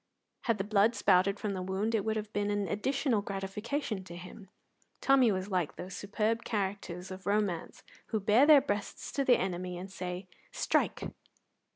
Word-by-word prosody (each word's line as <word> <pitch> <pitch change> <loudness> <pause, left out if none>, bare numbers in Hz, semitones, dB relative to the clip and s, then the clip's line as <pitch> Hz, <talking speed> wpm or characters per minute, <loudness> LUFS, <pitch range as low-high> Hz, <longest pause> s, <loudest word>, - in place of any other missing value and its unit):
Had 230 -3 +2
the 195 - -1
blood 210 +2 +3
spouted 195 +1 +3
from 210 -2 -2
the 185 - -3
wound, 190 +4 -1
it 215 -3 +2
would 220 +1 0
have 215 0 -4
been 205 0 0
an 205 -1 0
additional 245 - 0
gratification 200 +3 -3
to 170 - -9
him. 185 +3 -11 0.5
Tommy 265 -4 +5
was 190 +1 -3
like 180 -5 0
those 185 +1 -7
superb 215 +3 -1
characters 190 -3 -3
of 185 +1 -8
romance 200 -5 -1 0.2
who 220 - -1
bare 215 +8 +5
their 300 -3 +9
breast 205 -7 -4
to 275 - +2
the 255 -2 +5
enemy 180 -1 -3
and 190 +2 -7
say, 180 0 -5 0.2
"Strike!" - - 0
205 Hz, 175 wpm, -31 LUFS, 185-220 Hz, 0.5 s, their